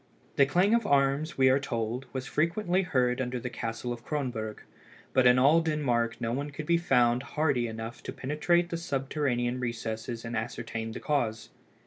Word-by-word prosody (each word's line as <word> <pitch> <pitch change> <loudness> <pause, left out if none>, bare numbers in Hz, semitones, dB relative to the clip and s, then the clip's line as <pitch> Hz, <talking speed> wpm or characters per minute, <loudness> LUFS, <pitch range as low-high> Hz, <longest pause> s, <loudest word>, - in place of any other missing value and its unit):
The 140 - +5
clang 180 +9 +3
of 235 -2 +2
arms, 140 +3 +2
we 130 -1 +5
are 135 - +3
told, 120 -1 -3
was 130 -1 -4
frequently 175 +4 +1
heard 130 -7 +1
under 125 0 -2
the 125 +1 -5
castle 115 +1 -4
of 120 0 -10
Cronberg, 120 -8 -3 0.5
but 130 -1 +5
in 125 0 +6
all 145 +6 +5
Denmark 125 -8 0
no 115 -1 -2
one 140 +3 -2
could 145 +1 -7
be 170 +2 +3
found 125 -7 +3 0.2
hardy 140 -6 +2
enough 110 +1 -6
to - - -6
penetrate 155 +5 +1
the 170 - -1
subterranean 135 -5 -1
recesses 115 -1 -4
and 115 0 -4
ascertain 115 0 -4
the - - -6
cause. 120 -7 -1
130 Hz, 175 wpm, -29 LUFS, 120-150 Hz, 0.5 s, in